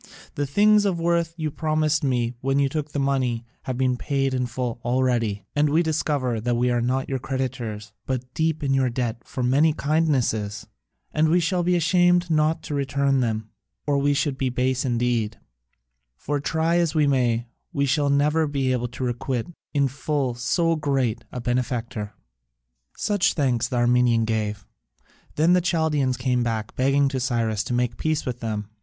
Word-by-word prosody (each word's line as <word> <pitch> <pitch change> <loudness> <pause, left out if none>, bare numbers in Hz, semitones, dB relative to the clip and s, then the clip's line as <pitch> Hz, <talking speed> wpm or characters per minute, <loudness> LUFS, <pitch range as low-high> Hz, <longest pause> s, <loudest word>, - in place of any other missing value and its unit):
The 145 -1 -2
things 210 +7 +4
of 185 -4 0
worth 170 0 0
you 155 -2 -2
promised 155 0 0
me 125 -3 0
when 135 +1 +1
you 140 -1 +3
took 150 +1 -3
the - - -4
money 130 -4 0 0.2
have 130 -2 -3
been 130 -1 +1
paid 135 0 -1
in 125 -1 0
full 120 -1 -3
already, 120 -4 0
and 150 0 +3
we 160 +4 +3
discover 145 -7 -1
that 120 +1 0
we 125 +1 +2
are 120 0 +1
not 130 +2 0
your 135 -1 -2
creditors, 120 -6 -4 0.2
but 125 -1 -3
deep 160 -1 0
in 135 -1 +1
your 135 -1 +2
debt 115 -2 -3
for 130 - -5
many 145 +6 +3
kindnesses; 130 -10 0 0.5
and 155 +1 +2
we 175 +3 +4
shall 175 +2 0
be 180 +1 +2
ashamed 175 0 +3
not 155 +1 +2
to 150 - -5
return 140 -1 +1
them, 110 -3 -1 0.4
or 145 -1 +1
we 145 +1 +2
should 140 -2 -1
be 130 - +1
base 130 +1 0
indeed, 120 -3 0 0.8
for 145 0 -2
try 160 +4 +1
as 170 -2 +1
we 155 -1 +4
may, 120 -4 +1 0.3
we 140 -1 0
shall 145 +1 +1
never 150 +3 +2
be 135 -3 0
able 125 -1 0
to 120 +2 -7
requite 120 0 -2 0.3
in 140 -2 +2
full 135 0 -2
so 165 +7 +1
great 135 -7 -1
a 125 - -5
benefactor." 120 -3 -2 0.8
Such 205 -4 +1
thanks 130 -6 +1
the 125 - -4
Armenian 120 -1 +3
gave. 105 -2 -2 0.7
Then 165 +4 +4
the 180 - +4
Chaldaeans 155 -7 +1
came 125 0 0
back, 110 -2 -2
begging 140 +2 +3
Cyrus 115 -5 0
to 120 - -2
make 120 -1 0
peace 155 -1 -1
with 125 -1 -4
them. 110 -3 -3
130 Hz, 175 wpm, -24 LUFS, 120-150 Hz, 0.8 s, things